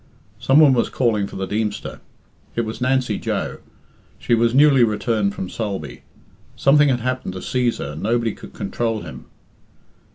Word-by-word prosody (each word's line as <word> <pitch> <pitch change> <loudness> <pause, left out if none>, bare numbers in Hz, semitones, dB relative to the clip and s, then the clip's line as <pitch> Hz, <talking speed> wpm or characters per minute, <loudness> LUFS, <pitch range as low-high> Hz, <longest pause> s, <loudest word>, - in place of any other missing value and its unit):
Some 135 +4 +4
one 150 -4 +7
was 120 - +1
calling 110 -6 0
for - - -11
the 95 - -3
Deemster. 105 +1 -3 0.6
It 115 - +1
was 110 +2 -6
Nancy 130 -4 +1
Joe. - - -3 0.6
She - - -1
was 115 +1 +2
newly 140 -3 +6
returned 105 -2 0
from 95 - -4
Sulby. 100 -9 -5 0.5
Something 145 +1 +4
had 125 -2 0
happened 130 -5 -3
to 95 - -6
Cæsar, 125 - -1
and 75 - -8
nobody 115 0 0
could - - -13
control 110 +2 -2
him. - - -10
115 Hz, 160 wpm, -21 LUFS, 105-130 Hz, 0.6 s, one